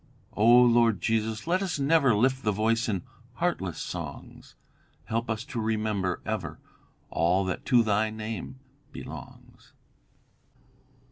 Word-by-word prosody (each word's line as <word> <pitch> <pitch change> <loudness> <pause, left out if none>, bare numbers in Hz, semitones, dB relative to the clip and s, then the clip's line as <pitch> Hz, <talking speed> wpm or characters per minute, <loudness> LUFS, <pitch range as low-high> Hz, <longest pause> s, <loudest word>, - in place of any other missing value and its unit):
"'O 105 +2 +2
Lord 120 -3 +6
Jesus, 110 +2 -1
let 180 +3 +1
us 190 -5 -2
never 140 -4 +3
Lift 130 +5 +2
the 105 - +2
voice 115 +3 +1
in 95 -5 -2 0.3
heartless - - -2
songs; - - -7 0.5
Help 115 +1 -2
us 110 +1 -2
to 120 -2 -5
remember 110 -4 -1
ever - - -3 0.5
All 90 +3 +2
that 95 - -4
to 125 -3 +5
thy 110 0 +1
name 110 +4 -6 0.3
belongs.'" - - -11
110 Hz, 125 wpm, -27 LUFS, 105-125 Hz, 0.5 s, Lord